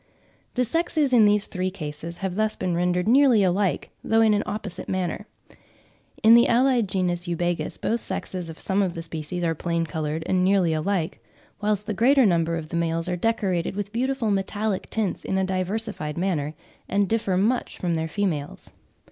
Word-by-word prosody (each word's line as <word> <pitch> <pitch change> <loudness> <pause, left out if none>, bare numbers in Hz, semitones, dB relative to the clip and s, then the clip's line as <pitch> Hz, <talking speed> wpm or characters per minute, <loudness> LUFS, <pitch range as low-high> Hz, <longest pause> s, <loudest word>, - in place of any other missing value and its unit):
The 250 -1 +2
sexes 315 -1 0
in 225 -3 +7
these 205 0 +3
three 185 0 -2
cases 165 -1 -7
have 190 - -2
thus 215 +2 0
been 180 - -2
rendered 180 +2 +1
nearly 250 -3 +5
alike, 190 0 0
though 225 0 +3
in 220 -1 +5
an 205 - +2
opposite 200 -3 -5
manner. 185 +2 -2 1.0
In 220 +1 +8
the 235 +1 +7
allied 240 -3 +3
genus 180 -2 -1
Eubagis, 175 0 -2
both 230 - 0
sexes 180 -3 -5
of 160 - -9
some 195 +1 0
of 185 -3 0
the 165 - -6
species 165 +2 -5
are 165 - +1
plain 170 +1 -1
coloured 155 0 -3
and 180 +1 +1
nearly 185 -3 +3
alike; 160 -5 -2 0.4
whilst 210 -1 0
with 210 -1 -4
the - - -11
greater 265 +2 +5
number 170 -3 +2
the 155 +2 -7
males 165 0 0
are 180 - -1
decorated 190 -3 0
with 205 +1 -4
beautiful 255 -2 0
metallic 200 +1 -1
tints 215 -5 -2
in 190 - -1
a 190 - +2
diversified 185 -3 -2
manner, 160 -5 -1 0.3
and 200 +1 +2
differ 205 -3 0
much 230 +6 0
from 175 -2 -1
their 160 0 -1
females. 160 -5 -3
190 Hz, 180 wpm, -24 LUFS, 170-215 Hz, 1.0 s, In